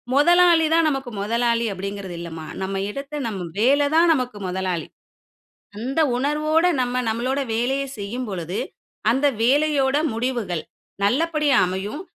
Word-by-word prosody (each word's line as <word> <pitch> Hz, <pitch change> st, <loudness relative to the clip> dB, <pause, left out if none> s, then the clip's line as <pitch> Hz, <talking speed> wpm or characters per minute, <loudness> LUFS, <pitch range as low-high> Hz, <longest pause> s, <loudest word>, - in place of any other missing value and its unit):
"முதலாளிதான் 330 Hz, +1 st, +5 dB
நமக்கு 270 Hz, -4 st, -4 dB
முதலாளி" 235 Hz, +2 st, +1 dB
அப்டிங்கிறது 195 Hz, -1 st, -6 dB
இல்லம்மா. 165 Hz, -2 st, -7 dB, 0.2 s
நம்ம 195 Hz, +1 st, -3 dB
இடத்த 280 Hz, +5 st, -5 dB
"நம்ம 190 Hz, -6 st, -5 dB
வேலதான் 290 Hz, +7 st, +4 dB
நமக்கு 250 Hz, -5 st, -3 dB
முதலாளி". 180 Hz, -2 st, -2 dB, 0.9 s
அந்த 265 Hz, +7 st, -2 dB, 0.2 s
உணர்வோட 305 Hz, +5 st, +1 dB, 0.2 s
நம்ம 250 Hz, 0 st, -1 dB
நம்மளோட 250 Hz, +5 st, -1 dB, 0.2 s
வேலைய 265 Hz, +4 st, 0 dB
செய்யும் 225 Hz, +5 st, -4 dB
பொழுது, 180 Hz, 0 st, -4 dB, 0.5 s
அந்த 265 Hz, +5 st, +2 dB, 0.2 s
வேலையோட 280 Hz, +1 st, +3 dB, 0.2 s
முடிவுகள் 225 Hz, -8 st, -2 dB, 0.4 s
நல்லபடியா 300 Hz, +3 st, +2 dB
அமையும். 190 Hz, -, -4 dB
250 Hz, 115 wpm, -22 LUFS, 200-290 Hz, 0.9 s, முதலாளிதான்